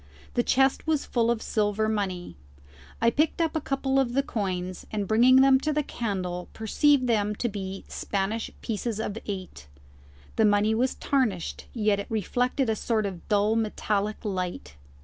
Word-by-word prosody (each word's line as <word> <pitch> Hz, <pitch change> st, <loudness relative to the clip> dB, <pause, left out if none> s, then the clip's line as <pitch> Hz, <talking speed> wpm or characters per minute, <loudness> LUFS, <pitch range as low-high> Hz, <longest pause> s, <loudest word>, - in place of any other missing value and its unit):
The 240 Hz, -, +2 dB
chest 265 Hz, +4 st, +2 dB
was 310 Hz, -3 st, +1 dB
full 235 Hz, -2 st, +1 dB
of 235 Hz, -2 st, 0 dB
silver 210 Hz, 0 st, 0 dB
money. 190 Hz, -, -2 dB, 0.6 s
I 230 Hz, 0 st, +4 dB
picked 305 Hz, +6 st, +1 dB
up 325 Hz, -2 st, 0 dB
a 315 Hz, -, 0 dB
couple 270 Hz, -1 st, 0 dB
of 245 Hz, -3 st, 0 dB
the 275 Hz, +2 st, +2 dB
coins, 185 Hz, -6 st, -3 dB
and, 205 Hz, -2 st, -2 dB
bringing 245 Hz, +5 st, +6 dB
them 270 Hz, -1 st, +6 dB
to 305 Hz, +3 st, -1 dB
the 300 Hz, 0 st, 0 dB
candle, 185 Hz, -8 st, -3 dB
perceived 255 Hz, +5 st, +2 dB
them 210 Hz, -3 st, +1 dB
to 240 Hz, -, -1 dB
be 195 Hz, -3 st, -5 dB
Spanish 205 Hz, +3 st, -2 dB
pieces 225 Hz, 0 st, -2 dB
of 220 Hz, 0 st, -3 dB
eight. 185 Hz, -, -6 dB, 0.7 s
The 220 Hz, -, +5 dB
money 205 Hz, +1 st, +3 dB
was 250 Hz, +4 st, +1 dB
tarnished, 235 Hz, -, -1 dB
yet 210 Hz, -3 st, +1 dB
it 200 Hz, -, -6 dB
reflected 245 Hz, +4 st, 0 dB
a 220 Hz, -, +1 dB
sort 215 Hz, 0 st, 0 dB
of 185 Hz, -4 st, -6 dB
dull 210 Hz, +1 st, +3 dB
metallic 215 Hz, -1 st, -1 dB
light. 180 Hz, -, -3 dB
220 Hz, 170 wpm, -27 LUFS, 200-250 Hz, 0.7 s, bringing